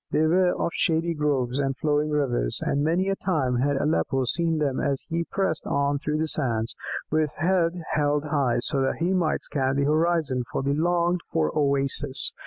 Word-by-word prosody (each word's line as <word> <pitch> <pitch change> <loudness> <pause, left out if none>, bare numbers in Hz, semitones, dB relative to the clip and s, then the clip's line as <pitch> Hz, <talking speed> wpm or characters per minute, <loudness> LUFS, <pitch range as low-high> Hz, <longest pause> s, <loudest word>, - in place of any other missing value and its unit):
They 155 - +2
were 180 +2 +3
of - - 0
shady 165 +1 +1
groves 140 -4 0
and 135 -1 -1
flowing 150 -1 0
rivers, 135 - -1
and 145 - 0
many 170 +5 +1
a 195 - +1
time 145 -11 0
had 140 +3 +1
Aleppo 135 -2 0
seen 165 +5 +1
them 140 -4 0
as 140 -2 -1
he 170 +1 -1
pressed 190 -4 -2
on 140 0 0
through 150 +1 -2
the 160 - 0
sands, 120 -8 0 0.4
with 155 -1 +1
head 175 0 0
held 145 0 +1
high, 140 -6 0
so 135 +2 -1
that 135 - 0
he 175 +3 0
might 175 -4 0
scan 135 -2 -1
the 140 - +1
horizon 155 -3 +1
for - - -2
the 140 +1 +1
longed 175 +3 +1
for 75 -1 0
oasis. 140 -1 +1
150 Hz, 190 wpm, -25 LUFS, 135-165 Hz, 0.4 s, were